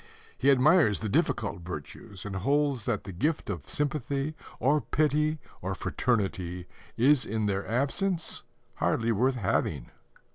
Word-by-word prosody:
He 140 - +2
admires 140 - +5
the 110 - -2
difficult 90 - 0
virtues, 90 +5 -8
and 100 -2 -4
holds 140 +2 +1
that 115 -4 -1
the 95 - -7
gift 140 - -1
of 80 -8 -7
sympathy 145 0 -1 0.3
or 145 +5 +3
pity 150 +1 +1 0.2
or - - -2
fraternity 95 -7 -1 0.3
is 135 +3 +5
in 110 0 -2
their 100 -1 -1
absence 160 - 0 0.4
hardly 115 0 +1
worth 125 +5 +2
having. 75 - -1
120 Hz, 135 wpm, -28 LUFS, 100-145 Hz, 0.4 s, admires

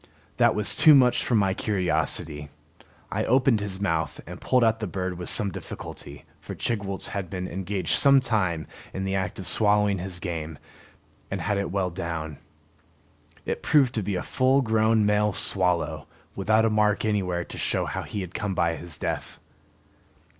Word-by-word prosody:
That - - +4
was 105 -1 +3
too 155 -2 +7
much 125 -3 +4
for 120 - 0
my 100 -3 +2
curiosity. 80 -7 -1 0.6
I - - -1
opened 130 -2 +3
his 100 -2 -5
mouth 85 -5 -1
and - - -10
pulled 125 -2 +2
out 110 0 +2
the 110 - -3
bird 90 0 -3
with 90 0 -1
some 105 -4 +2
difficulty, 70 -3 -9
for - - -8
Chigwooltz 100 -4 -2
had 100 -3 -4
been 90 +1 -4
engaged 95 +2 -2
some 140 -1 +6
time 95 - -1 0.3
in 95 - -3
the 95 0 -2
act 95 -2 -2
of 95 - -7
swallowing 105 -2 +2
his 90 0 -4
game 80 -3 -5 0.7
and - - -3
had 105 -1 -1
it 100 - -2
well 95 -1 -1
down. 85 -4 -5 1.1
It - - -3
proved 135 -5 +3
to 110 - 0
be 100 -1 -2
a 90 - -2
full 130 +1 +2
grown 110 -1 +2
male 105 0 +2
swallow, 85 -7 +1 0.3
without 110 +3 +2
a 110 - +2
mark 105 0 +2
anywhere 90 -5 -1
to - - -10
show - - 0
how - - -4
he 105 - -5
had 90 -1 -7
come 105 -3 -3
by 85 -1 +1
his 85 -3 -10
death. - - -4
100 Hz, 175 wpm, -25 LUFS, 90-110 Hz, 1.1 s, too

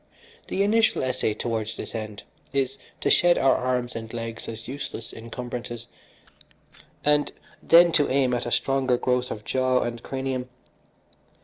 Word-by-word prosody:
The 195 - +1
initial 220 -3 +3
essay 125 -4 0
towards 110 -1 -3
this - - -7
end 110 -2 -5 0.3
is 135 -1 0 0.2
to - - +2
shed 175 0 +5
our 135 - +5
arms 125 -1 -1
and 110 -1 -6
legs 115 -1 -5
as 115 0 -7
useless 135 -3 -6
incumbrances, 120 0 -6 1.2
and 150 0 +3 0.3
then 170 +1 +7
to 150 -3 +3
aim 130 -1 +2
at 120 0 -1
a - - -3
stronger 130 -2 +2
growth 125 0 0
of 105 - -6
jaw 130 -1 +2
and 120 -1 -4
cranium. 130 -1 -3
125 Hz, 145 wpm, -25 LUFS, 115-135 Hz, 1.2 s, then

